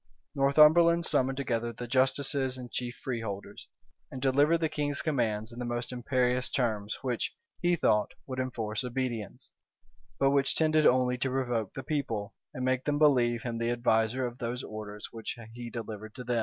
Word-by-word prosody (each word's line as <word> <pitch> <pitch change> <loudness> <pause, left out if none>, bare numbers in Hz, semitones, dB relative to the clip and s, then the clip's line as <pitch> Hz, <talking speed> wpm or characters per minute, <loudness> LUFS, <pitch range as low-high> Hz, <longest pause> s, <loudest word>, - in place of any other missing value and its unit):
Northumberland 155 +4 +5
summoned 130 -3 +1
together 120 -4 -1
the 120 +2 -7
justices 130 +1 +1
and 125 -2 -8
chief 120 0 -3
freeholders, 105 -5 -5 0.4
and 130 - -7
delivered 140 +5 +4
the 160 -1 0
king's 145 -2 -2
commands 115 -7 0
in 120 - -9
the - - -2
most 120 +1 -3
imperious 125 0 0
terms 110 -5 -1
which, 125 -3 -2 0.3
he 175 0 +3
thought, 105 -10 +2
would 130 -1 -5
enforce 115 -4 -2
obedience, 125 -4 -4 0.7
but 135 0 +3
which 140 -1 +2
tended 155 -1 +4
only 125 0 +3
to 130 - 0
provoke 120 -5 -1
the 135 - -5
people, 120 -8 -2 0.2
and 130 - -4
make 130 0 +1
them 145 -1 +1
believe 125 -6 +3
him 120 -2 -3
the 115 0 0
adviser 120 +1 +1
of 120 +1 -6
those 120 +1 -3
orders 105 -1 -7
which 115 +1 -6 0.2
he 120 0 -7
delivered 110 -2 -7
to 125 - -7
them. 120 -1 0
125 Hz, 170 wpm, -30 LUFS, 115-135 Hz, 0.7 s, Northumberland